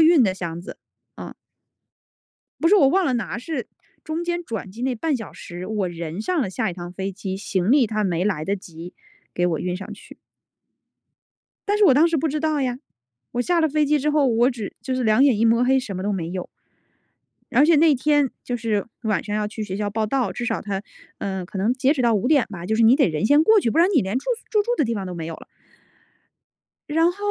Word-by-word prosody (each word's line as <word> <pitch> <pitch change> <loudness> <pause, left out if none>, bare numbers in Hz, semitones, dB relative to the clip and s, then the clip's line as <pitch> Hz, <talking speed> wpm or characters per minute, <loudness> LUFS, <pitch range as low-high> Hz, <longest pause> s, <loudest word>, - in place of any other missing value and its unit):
运 320 -3 +6
的 195 -5 +2
箱 170 -2 -6
子， - - -10 0.4
嗯。 - - -8 1.3
不 330 - +3
是 405 - +6
我 280 -9 +6
忘 375 +6 +2
了 260 - +1
拿， 235 0 -3
是 260 +1 -5 0.4
中 315 +2 -3
间 345 0 -2
转 220 - -5
机 225 +6 -9
那 260 0 0
半 290 +5 -1
小 225 -4 -8
时， 175 +1 -8
我 205 -3 -1
人 170 +1 -6
上 350 +8 0
了 245 - -1
下 190 +2 -1
一 - - -6
趟 175 0 -8
飞 195 +1 -4
机， 190 0 -5
行 195 0 -1
李 270 -2 +5
它 215 -1 -1
没 180 -2 0
来 185 -7 -1
得 200 +4 -1
及 175 -2 -11 0.4
给 175 - +1
我 165 -3 0
运 180 +2 -2
上 190 - -8
去。 - - -15 1.5
但 410 - +2
是 420 - +5
我 280 - +6
当 305 +5 +5
时 330 - 0
不 315 +2 0
知 305 +1 -2
道 310 -1 0
呀， 250 -2 -1 0.5
我 245 - 0
下 345 +6 +1
了 315 - +3
飞 300 +1 +1
机 300 +1 +2
之 295 +2 0
后， 295 -2 +3
我 240 +1 +3
只 225 -5 -6
就 260 - -2
是 255 -1 -1
两 220 +3 +4
眼 260 -7 +3
一 225 - +2
抹 230 +2 +4
黑 265 +1 +3
什 225 -7 -5
么 185 - -4
都 205 - -1
没 170 -4 -3
有。 185 0 -4 1.1
而 275 +5 +6
且 330 -1 +5
那 310 0 +5
天 290 0 +2
就 245 - -2
是 220 -3 -1 0.2
晚 215 -3 0
上 210 0 -3
要 210 - -1
去 215 +1 -6
学 190 -2 -4
校 205 0 -2
报 215 +1 -1
到， 260 +2 0
至 245 - -4
少 - - -2
它， 200 -2 -3 0.4
呃， 190 -2 -3
可 190 +2 -7
能 210 +6 +2
截 265 +2 +2
止 295 - -3
到 235 -1 +3
5 205 +2 0
点 280 -2 +3
吧， 185 -5 -8
就 220 - 0
是 225 - +2
你 230 +4 +6
得 275 -7 +3
人 160 +5 -1
先 290 +5 +5
过 440 +1 +6
去， 230 - 0
不 - - 0
然 345 +3 +5
你 290 - +5
连 205 +4 -1
住 - - -12
宿 - - -20
住 425 -2 +3
住 475 - -4
的 300 - +2
地 230 -1 -1
方 195 -3 -4
都 180 - -6
没 165 -2 -5
有 165 - -5
了。 - - -13 1.4
然 325 +3 +3
后 - - -18
230 Hz, 265 characters per minute, -22 LUFS, 195-290 Hz, 1.5 s, 运